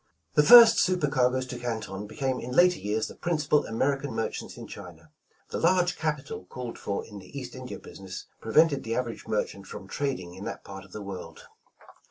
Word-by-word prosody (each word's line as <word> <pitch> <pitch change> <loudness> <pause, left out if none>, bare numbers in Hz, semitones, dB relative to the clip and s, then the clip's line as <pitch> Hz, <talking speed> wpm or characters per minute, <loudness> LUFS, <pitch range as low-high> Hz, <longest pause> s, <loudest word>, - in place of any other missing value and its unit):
The - - +6
first 230 +8 +10
super 180 -5 +2
cargoes 130 -2 +2
to 125 -1 -7
Canton 110 -4 -4
became 130 +3 -2
in 125 - -6
later 180 +4 +5
years 105 +2 -1
the - - -9
principal 150 -3 +1
American 135 +3 -1
merchants 115 - -4
in - - -8
China. 80 -6 -11 0.4
Thi» - - -2
large 180 +1 +3
capital 150 - -3
called 120 +5 -7
for 100 -1 -3
in 105 -2 -10
the 100 - -11
East 125 -2 -8
India 130 -1 -7
business, 95 -2 -9 0.2
prevented 140 +4 +3
the 115 0 -2
average 120 -2 -3
merchant 100 -2 -2
from 95 - -9
trading 115 -8 -3
in 95 +2 -9
that - - -6
part 95 -1 -9
of 100 - -18
the 105 +1 -7
world. 95 -2 -8
125 Hz, 190 wpm, -27 LUFS, 100-145 Hz, 0.4 s, first